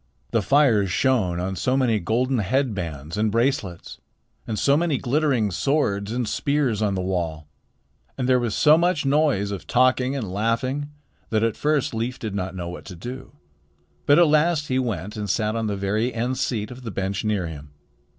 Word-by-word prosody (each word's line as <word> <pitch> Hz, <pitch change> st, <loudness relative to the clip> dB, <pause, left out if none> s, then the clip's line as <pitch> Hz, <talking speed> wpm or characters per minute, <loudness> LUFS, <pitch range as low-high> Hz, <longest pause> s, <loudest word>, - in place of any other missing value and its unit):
The 115 Hz, -, +2 dB
fires 115 Hz, -5 st, +3 dB
shone 95 Hz, -7 st, +1 dB
on 95 Hz, +2 st, -2 dB
so 130 Hz, +8 st, 0 dB
many 120 Hz, -5 st, +2 dB
golden 125 Hz, +6 st, 0 dB
head 130 Hz, +5 st, 0 dB
bands 80 Hz, -3 st, -5 dB
and 110 Hz, 0 st, +1 dB
bracelets 115 Hz, -7 st, -1 dB, 0.5 s
and 110 Hz, -, -3 dB
so 140 Hz, +5 st, +3 dB
many 160 Hz, -2 st, +1 dB
glittering 130 Hz, -6 st, +1 dB
swords 105 Hz, -, 0 dB
and 120 Hz, -1 st, -1 dB
spears 135 Hz, -2 st, 0 dB
on 100 Hz, -2 st, +1 dB
the 95 Hz, -, -2 dB
wall, 85 Hz, -5 st, -3 dB, 0.7 s
and 125 Hz, -2 st, -1 dB
there 130 Hz, -1 st, +4 dB
was 120 Hz, -3 st, -2 dB
so 155 Hz, +1 st, +5 dB
much 175 Hz, -4 st, +1 dB
noise 135 Hz, -8 st, +2 dB
of 100 Hz, -3 st, -6 dB
talking 130 Hz, +1 st, +2 dB
and 105 Hz, -9 st, -4 dB
laughing, 130 Hz, +7 st, -1 dB, 0.4 s
that 110 Hz, 0 st, +1 dB
at 115 Hz, -1 st, +1 dB
first 150 Hz, -4 st, 0 dB
Leif 115 Hz, +3 st, -2 dB
did 110 Hz, -3 st, -5 dB
not 95 Hz, -1 st, -3 dB
know 90 Hz, -2 st, -5 dB
what 90 Hz, -, -8 dB
to 95 Hz, -, -9 dB
do. 125 Hz, +11 st, -8 dB, 0.7 s
But 145 Hz, -, +6 dB
at 175 Hz, -, +7 dB
last 155 Hz, 0 st, +2 dB
he 130 Hz, 0 st, +1 dB
went 105 Hz, -4 st, -3 dB
and 105 Hz, -1 st, -4 dB
sat 110 Hz, +2 st, 0 dB
on 115 Hz, -1 st, -1 dB
the 100 Hz, -1 st, -2 dB
very 105 Hz, +5 st, 0 dB
end 125 Hz, +2 st, -2 dB
seat 110 Hz, -4 st, -2 dB
of 125 Hz, +1 st, -9 dB
the 120 Hz, -, -6 dB
bench 95 Hz, +1 st, -3 dB
near 105 Hz, -4 st, 0 dB
him. 75 Hz, -3 st, -8 dB
115 Hz, 190 wpm, -23 LUFS, 100-130 Hz, 0.7 s, at